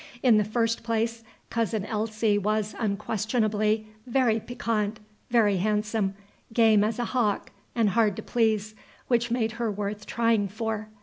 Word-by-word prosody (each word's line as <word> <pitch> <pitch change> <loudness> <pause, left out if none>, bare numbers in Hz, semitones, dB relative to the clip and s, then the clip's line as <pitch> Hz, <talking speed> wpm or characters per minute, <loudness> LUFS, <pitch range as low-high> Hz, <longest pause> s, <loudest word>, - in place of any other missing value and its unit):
In 240 -5 +6
the - - +3
first 230 +2 0
place, 230 0 -1 0.3
Cousin 220 -3 0
Elsie 215 0 0
was, 215 +1 0
unquestionably, 215 0 0 0.2
very 240 -3 +2
piquant, 220 -2 -2 0.3
very 215 -5 +3
handsome, 210 0 0 0.4
game 225 -2 +5
as 215 +1 0
a 240 - -1
hawk, 230 -5 0 0.2
and 225 -3 +3
hard 215 -1 +2
to - - -6
please, 220 -3 +1 0.4
which 240 -1 +2
made 230 -2 0
her 230 - +1
worth 210 0 -4
trying 230 -3 +2
for. 215 +1 -4
220 Hz, 140 wpm, -27 LUFS, 210-230 Hz, 0.4 s, In